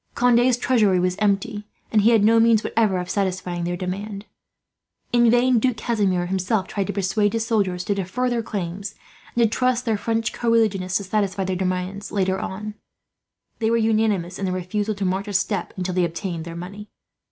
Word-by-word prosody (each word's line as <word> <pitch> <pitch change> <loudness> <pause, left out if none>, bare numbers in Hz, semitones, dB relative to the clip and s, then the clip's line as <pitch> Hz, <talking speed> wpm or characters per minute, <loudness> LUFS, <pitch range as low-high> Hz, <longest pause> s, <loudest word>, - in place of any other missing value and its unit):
Conde's 245 0 +4
treasury 215 -8 +3
was 180 0 +1
empty, 210 +1 0 0.2
and 215 - +4
he 215 - +5
had 225 -3 +4
no 225 +2 +5
means, 225 -1 +4
whatever, 215 -5 +1
of 180 0 -3
satisfying 185 -3 -2
their 175 0 -2
demand. 200 +3 -5 0.9
In 240 -1 +5
vain 245 +1 +4
Duke 250 0 +1
Casimir, 200 -6 0
himself, 190 +2 0
tried 200 -3 -2
to - - -3
persuade 200 +2 +1
his 225 -1 -1
soldiers 195 -6 0
to 205 - 0
defer 200 +6 -2
their 240 -2 0
claims, 195 -2 -5 0.4
and 235 - +3
to - - +5
trust 250 -1 +1
their 225 -3 +1
French 225 -1 -1
co 235 - -1
religionists 195 -5 +2
to 200 - -5
satisfy 195 -1 -1
their 185 0 -2
demands, 185 +2 -3
later 190 -1 0
on. 210 +3 -5 0.9
They 220 -1 +1
were 230 - +3
unanimous 215 -5 +1
in 195 - -2
their 185 -1 -1
refusal 205 +4 -2
to 200 -1 -3
march 190 +2 -1
a 205 - -5
step, 195 -1 -1
until 185 0 -2
they 180 0 +2
obtained 170 0 -4
their 170 -1 -7
money. 200 +5 -8
200 Hz, 195 wpm, -23 LUFS, 185-225 Hz, 0.9 s, he